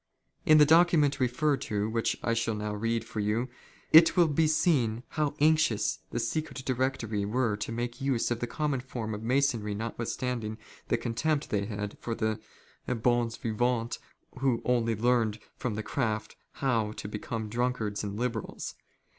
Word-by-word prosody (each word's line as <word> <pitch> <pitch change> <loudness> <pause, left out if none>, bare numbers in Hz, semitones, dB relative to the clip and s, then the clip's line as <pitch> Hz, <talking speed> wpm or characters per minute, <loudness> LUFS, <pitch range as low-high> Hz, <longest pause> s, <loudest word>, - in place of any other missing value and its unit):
In 155 - +8
the 150 - +8
document 155 -3 +4
referred 135 +2 +1
to, 105 -4 -1
which 115 +1 0
I 115 - +1
shall 115 -1 0
now 105 0 -3
read 115 +2 -1
for 110 - -5
you, 110 +5 0 0.4
it 165 +2 +8
will 175 -2 +6
be 155 +1 +2
seen 145 -8 +2
how 150 -2 -1
anxious 155 -8 +3
the - - -2
Secret 145 -4 -3
Directory 125 -5 -1
were 110 +1 +1
to 105 - -4
make 120 +2 -4
use 135 -4 0
of 120 - 0
the 120 - -2
most - - -13
common 150 -4 0
form 120 -4 -5
of 105 - -5
Masonry 115 -4 +1
not 115 +2 -5
withstanding 115 -2 -3 0.3
the - - +2
contempt 125 +6 -1
they 100 -1 +1
had 105 -1 -5
for 115 - -3
the 110 -1 -1 0.5
hons 120 -1 +1
vivants 115 +1 -1 0.4
who 130 -3 +1
only 115 -2 +2
learned 115 -1 +2 0.2
from 125 -5 -3
the 110 - -3
craft 110 -5 -2 0.2
how 115 -5 0
to 105 - -7
become 110 +1 -4
drunkards 115 -2 -1
and 100 0 -4
liberals. 115 -2 -3
120 Hz, 170 wpm, -29 LUFS, 110-135 Hz, 0.5 s, In